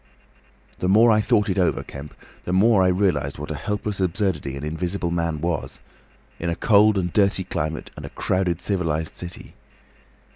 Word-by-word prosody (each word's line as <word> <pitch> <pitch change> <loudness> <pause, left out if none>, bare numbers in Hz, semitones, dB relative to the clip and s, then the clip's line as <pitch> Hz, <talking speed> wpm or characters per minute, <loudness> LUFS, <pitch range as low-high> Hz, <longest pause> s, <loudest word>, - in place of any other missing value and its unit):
"The 90 - 0
more 110 +4 +6
I 110 0 +4
thought 105 0 +2
it 95 -1 0
over, 90 - +1
Kemp, 70 +1 -10 0.3
the - - -3
more 100 +2 +4
I 95 - +4
realised 90 -7 +1
what - - -6
a - - -3
helpless 105 -1 -3
absurdity 95 -6 -1
an 70 - -7
Invisible 85 +3 -3
Man 85 -3 -1
was—in 85 0 -6
a 85 - -1
cold 105 +1 +4
and 90 -3 -1
dirty 100 -2 +2
climate 80 -3 -4
and - - -9
a - - -6
crowded 90 -2 -1
civilised 80 -5 -1
city. 90 -1 -9
90 Hz, 170 wpm, -23 LUFS, 80-100 Hz, 0.3 s, more